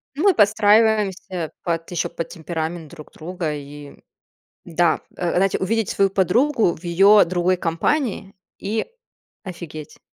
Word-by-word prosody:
Ну, 305 - -2
мы 400 -2 +5
подстраиваемся 210 -4 +2
под 165 -1 -2
ещё 175 -1 -1
под 165 0 -6
темперамент 160 -1 -5
друг 155 -2 -13
друга. 165 -1 -4
И 145 0 -10 0.7
да, 170 -1 +1 0.2
э 175 - -2
э, - - -2
знаете, 195 +1 +2
увидеть 220 +2 -1
свою 195 -1 +2
подругу 210 - +2
в 175 - -16
её 195 +4 +6
другой 180 +1 0
компании 195 - -1 0.2
и 215 +3 -2 0.6
офигеть, 165 -5 -9
180 Hz, 135 wpm, -21 LUFS, 165-205 Hz, 0.7 s, её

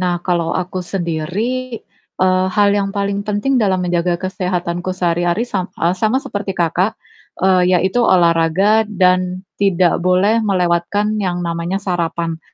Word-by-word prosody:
Nah 180 -1 0
kalau 170 -2 0
aku 185 0 -3
sendiri, 195 +9 -3 0.4
eee, 185 0 +3
hal 205 -1 +4
yang 200 -1 0
paling 200 0 -1
penting 220 +5 0
dalam 190 -3 +1
menjaga 175 0 0
kesehatanku 180 -1 -3
sehari-hari 175 +4 0
sam 195 -6 -3
eee, 170 +2 +1
sama 220 +6 +1
seperti 205 -7 -4
Kakak, 180 +5 0 0.5
eee, 185 -1 +3
yaitu 190 +7 +1
olahraga 185 +2 +3
dan 185 -1 +1 0.2
tidak 185 -3 +2
boleh 185 +5 +2
melewatkan 195 +2 0
yang 180 -2 -2
namanya 170 +2 -2
sarapan. 170 -3 -2
185 Hz, 135 wpm, -17 LUFS, 175-205 Hz, 0.5 s, hal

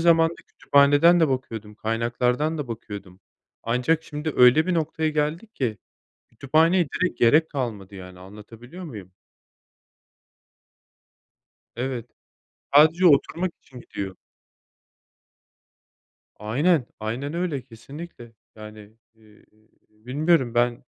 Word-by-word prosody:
zamanda 165 0 +4
kütüphaneden 145 +5 +4
de 160 - +4
bakıyordum, 115 -5 -4
kaynaklardan 125 +7 -1
da 145 -4 -5
bakıyordum. 100 -5 -9 0.4
Ancak 125 +8 0
şimdi 150 +1 -5
öyle 125 +6 +6
bir 185 - 0
noktaya 160 -1 -1
geldik 155 +8 -2
ki 110 -7 -2 0.5
kütüphaneye 160 +8 +2
direkt 185 +6 -2
gerek 155 +7 +4
kalmadı 110 -8 -5
yani, 90 -1 -11
anlatabiliyor 115 - -12
muyum? 105 - -9 2.7
Evet, 125 -1 -4 0.7
sadece 160 +5 +6
oturmak 170 +3 +2
için 125 -2 -14
gidiyor. 95 -5 -7 2.2
Aynen, 130 - +1
aynen 125 +8 -4
öyle 170 -6 -2
kesinlikle. 125 +1 -12 0.2
Yani, 105 -1 -12 0.2
eee, 110 -1 -23 0.4
bilmiyorum 130 +4 0
ben, 120 0 0
130 Hz, 95 wpm, -24 LUFS, 110-160 Hz, 2.7 s, öyle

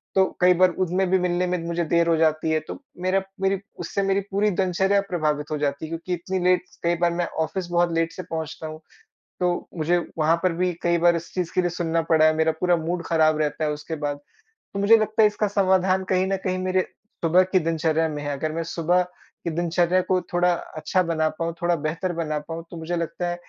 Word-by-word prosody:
तो 190 - +5 0.2
कई 180 0 +6
बार 185 +1 +4
उनमे 185 +2 0
भी 190 - +5
मिलने 180 0 0
में 180 0 0
मुझे 170 0 -1
देर 170 0 +4
हो 165 - +4
जाती 155 0 +2
है 155 - +2
तो - - -7 0.2
मेरा 190 +1 +2 0.2
मेरी 195 0 +1 0.2
उससे 200 - -2
मेरी 195 0 +2
पूरी 205 +2 +2
दिनचर्या 190 +2 +2
प्रभावित 155 -3 -1
हो 150 - 0
जाती 145 +1 -2
है - - -8
क्योंकि 165 +2 -4
इतनी 185 +2 -2
लेट 180 0 +3 0.2
कई 170 0 +2
बार 170 0 +3
मैं 175 0 0 0.2
ऑफिस 190 -1 -4
बहुत 175 0 +2
लेट 165 0 +1
से 185 +2 -7
पहुँचता 160 -1 -5
हूँ। 155 0 -8 0.6
तो 180 -1 0
मुझे 165 +3 +2 0.2
वहाँ 160 +2 +3
पर 185 - +3
भी 180 +1 0
कई 170 0 +2
बार 170 0 +4
इस 170 0 -6
चीज़ 180 -3 -2
के 185 - +3
लिए 175 - 0
सुनना 165 -1 -1
पड़ा 160 -1 +5
है। 155 - +5
मेरा 160 0 +2
पूरा 180 -1 +3
मूड 170 +2 -3
खराब 155 -2 +3
रहता 155 +1 -1
है 150 - +1
उसके 150 +2 -5
बाद। 145 -1 -1 0.6
तो 200 - -3
मुझे 215 +3 +6
लगता 215 +1 +1
है 215 - +8
इसका 210 0 -1
समाधान 190 -1 +2
कहीं 185 0 +2
न 195 0 0
कहीं 185 0 0
मेरे 185 0 +1 0.4
सुबह 180 +3 +5
की 185 - +4
दिनचर्या 160 0 +1
में 150 -1 -5
है। 145 - -3
अगर 155 +3 -2
मैं 165 +1 -2
सुबह 175 +2 +2
की 180 -1 -10
दिनचर्या 175 +1 +2
को 185 -1 +3
थोड़ा 175 0 +3
अच्छा 160 +2 -1
बना 160 -2 0
पाऊँ 165 0 -1
थोड़ा 175 0 +2
बेहतर 175 +3 -2
बना 155 -1 -2
पाऊँ 165 0 -5
तो 170 - -7
मुझे 165 +2 -3
लगता 170 +1 -3
है 175 - -2
175 Hz, 230 wpm, -24 LUFS, 160-185 Hz, 0.6 s, है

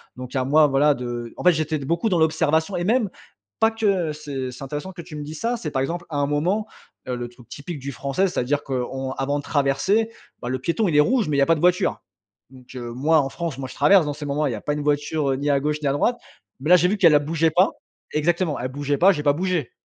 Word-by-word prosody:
donc, 125 0 -8
à 130 - 0
moi 150 +2 +5
voilà, 145 +2 +3
de 120 -2 -5
en - - -7
fait, 180 - +7
j'étais 155 -1 -1
d 140 - -7
beaucoup 170 - 0
dans 180 -5 +2
l'observation, 160 +2 +1
et 175 - -2
même, 225 -1 +2 0.5
pas 225 0 +4
que 195 -8 0
ce 140 -4 -5
c'est 125 - -10
intéressant 150 +7 -5
que 175 - -8
tu 155 -2 -10
me 150 - -5
dis 155 +2 -7
ça. 235 +9 -1
C'est, 155 -10 -5
par 135 - 0
exemple, 170 +5 -3
à 155 - -6
un 140 - +2
moment, 175 +9 0 0.4
heu, 125 - -2
le 120 - -4
truc 120 -1 -18
typique 145 +4 -7
du 140 +1 -5
Français. 140 +9 -1
C'est - - -2
à - - +1
dire 145 +2 0
qu'on 130 0 -3
avant 140 +2 -1
de - - -7
traverser, 155 +12 +1 0.3
bah - - -5
le 130 +1 -1
piéton 170 - 0
il 165 - 0
est - - +6
rouge 240 - +2
mais 150 - 0
il 140 - +3
y - - +5
pas 165 - +3
de - - -5
voiture. 180 +2 +2 0.5
Donc, 130 0 -15
heu, 120 -2 -6
moi, 155 +6 +3
en 135 - 0
France, 165 -2 -4
moi, 130 -2 -6
je - - -11
traverse 195 -5 +5
dans 145 - -2
ces 150 +1 -7
moments. 145 +2 0
Il - - -1
y - - -3
a 105 - -6
pas 145 - -1
une 150 - -3
voiture, 145 0 0
heu, - - +1
ni 145 +2 -1
à 140 -1 +3
gauche, 150 +1 0
ni 145 - -1
à 135 - +2
droite. 235 +12 +1 0.4
Mais 150 - -3
là, 180 - +9
j'ai 180 - +3
vu 210 - 0
qu'elle 170 -6 +6
elle 145 - +4
bougeait 165 +1 +2
pas. 180 +5 +4 0.4
Exactement. 165 0 0
Elle 125 - -2
bougeait 145 +1 -2
pas. 190 +6 +6
J'ai 150 - -4
pas 145 - +4
bougé. 175 -3 -1
150 Hz, 285 wpm, -23 LUFS, 135-175 Hz, 0.5 s, là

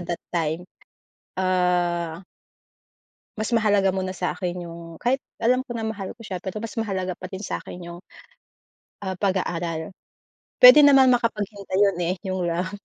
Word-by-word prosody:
that 175 -1 -4
time, 165 0 -1 0.7
ah 180 -2 0 1.1
mas 215 - -2
mahalaga 205 -3 +3
muna 185 -1 -2
sa - - -2
akin 180 -2 -3
yung, 170 0 -9 0.2
kahit 260 +3 +1 0.2
alam 250 +3 +2
ko 265 - -24
na, 225 -1 -3
mahal 205 -3 -4
ko 230 - -13
siya, 185 -4 -5
pero 190 +3 -5
mas 225 +1 -6
mahalaga 190 -4 -2
pa 185 - -8
din 190 +1 -7
sa'kin 180 - -5
yung, 170 0 -9 1.1
ah, 190 - -2
pag-aaral. 175 -4 -1 0.7
Puwede 250 +4 +11
naman 270 -2 +7
makapaghintay 210 -5 -1
'yon, 200 -3 +2
eh, 180 - 0
yung 185 0 -2
love. 175 +2 -1
190 Hz, 150 wpm, -24 LUFS, 175-215 Hz, 1.1 s, Puwede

